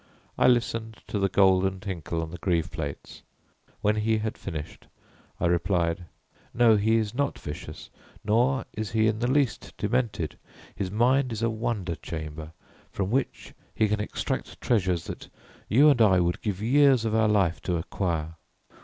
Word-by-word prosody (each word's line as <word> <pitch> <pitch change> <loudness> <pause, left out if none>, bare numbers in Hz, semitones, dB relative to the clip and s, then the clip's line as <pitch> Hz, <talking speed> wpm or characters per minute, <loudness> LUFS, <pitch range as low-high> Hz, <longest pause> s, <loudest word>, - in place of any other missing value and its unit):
I - - +3
listened 115 -2 +1
to 105 - -1
the 95 0 +2
golden 95 -1 +3
tinkle 85 -4 -4
on 80 - -7
the 90 - -8
greave 85 -3 0
plates; 70 -3 -6 0.6
when 105 +1 +2
he 110 +1 +1
had 110 0 -3
finished 80 -5 -7 0.5
I - - 0
replied: 85 0 +1 0.5
"No, 115 -2 +6
he 110 +2 +2
is 110 -1 0
not 140 +2 -1
vicious, 75 0 -8 0.3
nor 125 +5 +2
is 110 -1 -4
he 110 0 +2
in 110 0 +1
the 120 +1 0
least 140 -2 0
demented. 105 -7 -1 0.3
His 100 -2 -3
mind 125 +5 +2
is 115 0 -3
a 115 - +2
wonder 110 -5 -2
chamber, 80 -1 -7 0.4
from 95 0 -2
which 135 +1 -2 0.2
he 110 - +3
can 105 0 0
extract 105 - -4
treasures 95 -7 +1
that - - -8 0.4
you 140 +7 +6
and 120 - +2
I 95 -4 +5
would 85 0 0
give 105 -2 -3
years 135 -1 +4
of 110 - 0
our 110 -1 +3
life 95 -5 +2
to 90 -2 -1
acquire."' 80 -2 -3
105 Hz, 165 wpm, -26 LUFS, 85-115 Hz, 0.6 s, No